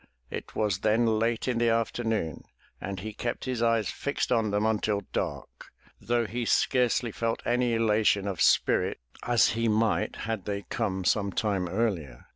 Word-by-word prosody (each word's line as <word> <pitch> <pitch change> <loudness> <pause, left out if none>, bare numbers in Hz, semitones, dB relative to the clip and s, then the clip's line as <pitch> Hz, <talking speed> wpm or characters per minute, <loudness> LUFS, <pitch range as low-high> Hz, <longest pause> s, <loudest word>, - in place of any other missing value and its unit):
It - - -7
was 105 -4 0
then 110 +3 +2
late 115 +1 0
in 125 -2 0
the 120 0 +3
afternoon 115 -6 -1 0.4
and 95 +1 -4
he 110 +2 -6
kept 120 +3 -4
his 130 -3 -2
eyes 115 -3 +2
fixed 140 -2 -2
on 115 -3 +2
them 105 +1 0
until 105 -2 +1
dark, - - -4 0.3
though 120 0 0
he 120 +3 -3
scarcely 120 0 +2
felt 115 +2 -2
any 120 -1 +1
elation 105 -3 +2
of 95 -4 -3
spirit, - - +3 0.2
as 120 -2 +3
he 115 +1 0
might 110 0 +1
had 110 -4 -3
they 100 -1 -3
come 95 -5 -1
some 100 0 +2
time 95 -5 -1
earlier. 95 - -2
110 Hz, 165 wpm, -28 LUFS, 100-115 Hz, 0.4 s, the